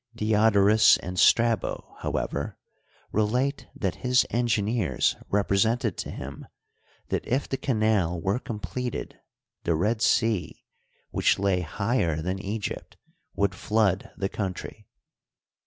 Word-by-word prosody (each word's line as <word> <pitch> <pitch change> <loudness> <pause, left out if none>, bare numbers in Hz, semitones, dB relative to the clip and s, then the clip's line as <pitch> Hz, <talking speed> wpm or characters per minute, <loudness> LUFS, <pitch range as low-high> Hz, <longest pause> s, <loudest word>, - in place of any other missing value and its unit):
Diodorus 110 -1 +5
and 90 0 -5
Strabo, 115 -1 +2
however, - - -3 0.5
relate 125 +7 0
that 95 -3 -2
his 125 0 +3
engineers 115 -4 +1
represented 105 +3 +1
to - - -4
him 70 +2 -8 0.6
that - - -1
if 130 +3 0
the - - -2
canal 110 - +1
were 95 +8 0
completed 125 +2 -5 0.4
the 85 - +1
Red 105 +7 0
Sea, 110 -7 +1 0.5
which - - +2
lay 95 -2 +1
higher 90 -2 -1
than 90 +4 -2
Egypt, 100 +2 -5 0.4
would 100 -1 +2
fl<x>d 100 0 +1
the 95 - -1
country. 95 -3 -5
105 Hz, 110 wpm, -26 LUFS, 95-115 Hz, 0.6 s, Diodorus